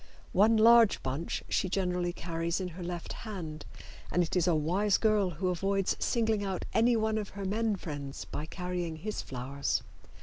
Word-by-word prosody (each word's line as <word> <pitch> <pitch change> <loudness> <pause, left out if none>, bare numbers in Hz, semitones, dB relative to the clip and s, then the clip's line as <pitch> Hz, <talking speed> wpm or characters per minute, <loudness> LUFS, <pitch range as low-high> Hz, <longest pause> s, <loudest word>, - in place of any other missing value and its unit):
One 215 +4 +5
large 230 0 +6
bunch 135 +6 -3
she 185 - 0
generally 180 -2 0
carries 170 0 -2
in 185 -1 -3
her 175 +2 -9
left 175 -1 -5
hand, 165 -9 -7 0.4
and 180 - +2
it 165 - -3
is 180 -1 +2
a 170 - +4
wise 185 +7 +2
girl 215 -4 +3
who 180 +3 -2
avoids 195 +2 0
singling 220 -3 +1
out 190 -2 -3
anyone 220 -2 +3
of 205 - -5
her 200 - -3
men 215 +2 +1
friends 145 -7 -6
by 150 - -5
carrying 180 -2 -3
his 210 +7 -4
flowers. 135 +2 -2
180 Hz, 170 wpm, -30 LUFS, 165-210 Hz, 0.4 s, large